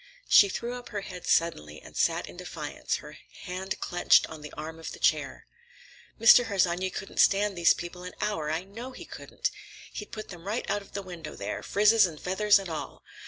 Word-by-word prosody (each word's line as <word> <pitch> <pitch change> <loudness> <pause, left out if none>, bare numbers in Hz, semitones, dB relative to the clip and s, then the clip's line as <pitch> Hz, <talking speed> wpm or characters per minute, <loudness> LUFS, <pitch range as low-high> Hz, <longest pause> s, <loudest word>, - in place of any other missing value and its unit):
She 200 - +7
threw 235 +5 -4
up 245 -1 -8
her 205 -2 -4
head 180 -2 -8
suddenly 75 - +1
and - - -15
sat - - +1
in - - -11
defiance, - - -4
her - - -11 0.2
hand 185 +1 -4
clenched 175 0 +4
on 155 -1 -10
the 150 - -9
arm 160 +1 -7
of 160 - -7
the - - -10
chair. - - +1 0.7
"Mr. 235 +2 +8
Harsanyi 185 -3 +1
couldn't 195 - -7
stand 200 0 +4
these 170 -1 +5
people 175 +1 -7
an 180 0 -8
hour, 165 -8 -1
I 160 +3 -1
know 230 +7 -9
he - - -10
couldn't. - - -4 0.4
He'd 210 - -7
put 215 - -7
them 175 0 -10
right 215 +4 -2
out 205 - 0
of 200 - -17
the 200 - -4
window 175 -4 -8
there, - - -4
frizzes 210 0 +4
and 155 -3 -9
feathers 205 +3 +4
and 195 -1 -5
all. 160 -2 -6
190 Hz, 205 wpm, -28 LUFS, 170-210 Hz, 0.7 s, Mr